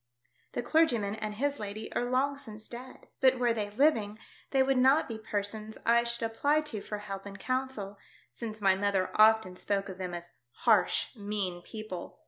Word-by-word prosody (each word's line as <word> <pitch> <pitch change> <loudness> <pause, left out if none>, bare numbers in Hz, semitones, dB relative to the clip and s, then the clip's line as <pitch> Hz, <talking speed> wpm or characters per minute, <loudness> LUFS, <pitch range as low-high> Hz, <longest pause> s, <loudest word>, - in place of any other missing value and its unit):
The - - -2
clergyman 240 -9 +3
and 215 -1 -4
his 285 +5 -1
lady 210 +1 -5
are 245 - -1
long 270 +3 +2
since 220 -6 -8
dead. 250 +2 -10
But 260 -1 +5
were 240 -2 +2
they 210 -2 -2
living, 215 -3 +2 0.3
they 270 -1 +4
would 265 -1 +2
not 265 +5 +5
be 225 -1 -5
persons 215 0 -4
I 235 +1 +5
should 235 0 -2
apply 285 +7 +2
to 255 -9 -4
for 210 - -5
help 195 -1 -6
and 200 0 -8
counsel, 255 -6 -3 0.3
since 220 -2 -6
my 195 -1 +5
mother 195 -1 0
often 215 -3 +5
spoke 200 +1 -1
of 190 0 -8
them 180 -2 -3
as 175 0 -8 0.3
harsh, 215 +1 +3
mean 200 -4 -3
people. 215 -2 -7
220 Hz, 180 wpm, -30 LUFS, 200-255 Hz, 0.3 s, But